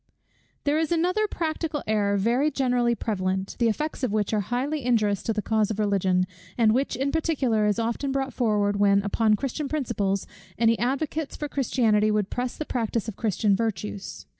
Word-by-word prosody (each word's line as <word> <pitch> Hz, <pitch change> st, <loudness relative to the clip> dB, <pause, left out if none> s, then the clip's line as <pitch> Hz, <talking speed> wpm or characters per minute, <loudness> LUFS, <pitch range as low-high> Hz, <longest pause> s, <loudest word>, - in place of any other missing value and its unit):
_ -, -, -49 dB
There 295 Hz, +2 st, +2 dB
is 320 Hz, +1 st, -1 dB
another 360 Hz, +6 st, +2 dB
practical 315 Hz, -4 st, -3 dB
error 205 Hz, -2 st, +1 dB
very 240 Hz, +9 st, +2 dB
generally 250 Hz, -4 st, +1 dB
prevalent, 190 Hz, -3 st, -2 dB
the 235 Hz, -, +3 dB
effects 300 Hz, +8 st, -3 dB
of 255 Hz, -5 st, 0 dB
which 210 Hz, 0 st, 0 dB
are 215 Hz, -, +2 dB
highly 255 Hz, +8 st, -2 dB
injurious 215 Hz, -5 st, +2 dB
to -, -, -1 dB
the 210 Hz, -1 st, -2 dB
cause 220 Hz, -2 st, +1 dB
of 215 Hz, -, -3 dB
Religion; 190 Hz, -3 st, +2 dB, 0.3 s
and 220 Hz, -2 st, +4 dB
which 270 Hz, +3 st, 0 dB
in 270 Hz, +3 st, -1 dB
particular 265 Hz, -10 st, +1 dB
is 210 Hz, -, +1 dB
often 235 Hz, +4 st, -1 dB
brought 270 Hz, -1 st, -2 dB
forward 210 Hz, -4 st, +1 dB
when, 200 Hz, -1 st, +4 dB
upon 215 Hz, +1 st, +2 dB
Christian 275 Hz, +4 st, -3 dB
principles, 200 Hz, -10 st, -1 dB, 0.3 s
any 230 Hz, 0 st, +3 dB
advocates 280 Hz, +4 st, -1 dB
for 295 Hz, -, -4 dB
Christianity 225 Hz, -6 st, +2 dB
would 210 Hz, -2 st, 0 dB
press 250 Hz, 0 st, -3 dB
the 310 Hz, -, -4 dB
practice 230 Hz, -4 st, -2 dB
of 220 Hz, -, -5 dB
Christian 210 Hz, -2 st, +1 dB
virtues. 210 Hz, -2 st, -4 dB
230 Hz, 185 wpm, -25 LUFS, 210-275 Hz, 0.3 s, and